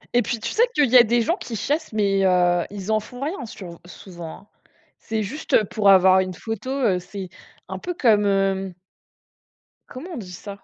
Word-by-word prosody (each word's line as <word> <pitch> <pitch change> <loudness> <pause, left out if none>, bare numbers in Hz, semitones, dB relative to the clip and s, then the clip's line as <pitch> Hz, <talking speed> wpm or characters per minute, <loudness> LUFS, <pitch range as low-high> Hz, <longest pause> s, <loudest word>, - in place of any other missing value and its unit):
Et 245 - +5
puis, 235 -2 -3
tu - - -4
sais 460 - +4
qu'il 285 -5 +3
y 255 - +8
a 240 - +9
des 235 +1 +1
gens - - 0
qui 235 - -7
chassent, 295 +7 -2
mais, 200 -2 +1
heu, 175 -1 +3
ils 200 +1 -5
en 215 - +3
font 245 +4 -12
rien 300 0 -4
sur 175 -6 -10
souvent, 175 -3 -10
hein? 205 - -24 0.5
C'est 220 -1 -3
juste 240 -1 0
pour 205 0 +1
avoir 190 0 +6
une 185 -1 -2
photo, 225 +5 -6
heu, 235 -9 +1
c'est 185 +1 -8 0.4
un - - -6
peu 355 - -4
comme 215 -7 +3
hem 195 -1 0 1.2
comment 330 +9 -9
on - - -6
dit 185 -5 -8
ça? 200 +2 -10
205 Hz, 205 wpm, -22 LUFS, 190-240 Hz, 1.2 s, a